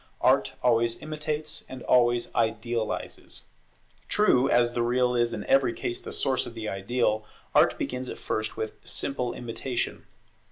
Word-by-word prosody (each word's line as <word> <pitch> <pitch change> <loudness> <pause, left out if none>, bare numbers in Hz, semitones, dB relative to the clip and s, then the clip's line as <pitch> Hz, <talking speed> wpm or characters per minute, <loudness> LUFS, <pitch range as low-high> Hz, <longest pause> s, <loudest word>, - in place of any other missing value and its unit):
Art - - +3
always 115 -1 +3
imitates, 155 0 -3
and 130 -1 -8
always 120 -1 +3
idealizes. 115 0 -2 0.6
True, 135 -12 +4
as 120 0 +4
the 120 - 0
real 125 +1 +2
is 120 -1 +2
in - - -4
every 275 +7 +4
case 360 +1 -3
the - - -7
source 130 -1 0
of 120 - -9
the 110 -1 -4
ideal, 110 +2 0 0.3
Art - - +5
begins 125 0 -3
at - - -6
first 110 0 -3
with 110 - -3
simple 125 -3 -2
Imitation. 120 +1 -3
120 Hz, 150 wpm, -27 LUFS, 115-130 Hz, 0.6 s, Art